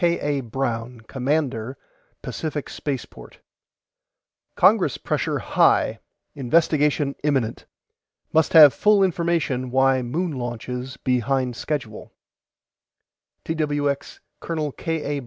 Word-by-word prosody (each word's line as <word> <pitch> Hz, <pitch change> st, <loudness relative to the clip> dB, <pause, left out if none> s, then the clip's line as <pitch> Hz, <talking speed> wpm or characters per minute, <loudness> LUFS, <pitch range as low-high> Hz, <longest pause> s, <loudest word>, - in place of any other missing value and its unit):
K. 170 Hz, -1 st, +2 dB
A. 145 Hz, -2 st, -1 dB
BROWN 120 Hz, -1 st, -4 dB
COMMANDER 130 Hz, 0 st, -2 dB, 0.5 s
PACIFIC 150 Hz, -3 st, -4 dB
SPACEPORT: 140 Hz, -4 st, -6 dB, 1.2 s
CONGRESS 190 Hz, -, +4 dB
PRESSURE -, -, -1 dB
HIGH -, -, +2 dB, 0.3 s
INVESTIGATION 145 Hz, 0 st, +1 dB
IMMINENT 135 Hz, -6 st, -1 dB, 0.7 s
MUST 160 Hz, -1 st, +3 dB
HAVE 150 Hz, -4 st, +9 dB
FULL 205 Hz, +5 st, +4 dB
INFORMATION 170 Hz, -8 st, 0 dB
WHY 130 Hz, +1 st, +3 dB
MOON 160 Hz, +9 st, -2 dB
LAUNCHES 125 Hz, 0 st, -5 dB
BEHIND 130 Hz, 0 st, 0 dB
SCHEDULE 120 Hz, -7 st, -5 dB, 1.3 s
TWX 145 Hz, -3 st, -2 dB, 0.2 s
COL. 155 Hz, -3 st, -3 dB
K. 150 Hz, -1 st, -3 dB
A. -, -, -3 dB
140 Hz, 95 wpm, -23 LUFS, 125-155 Hz, 1.3 s, HAVE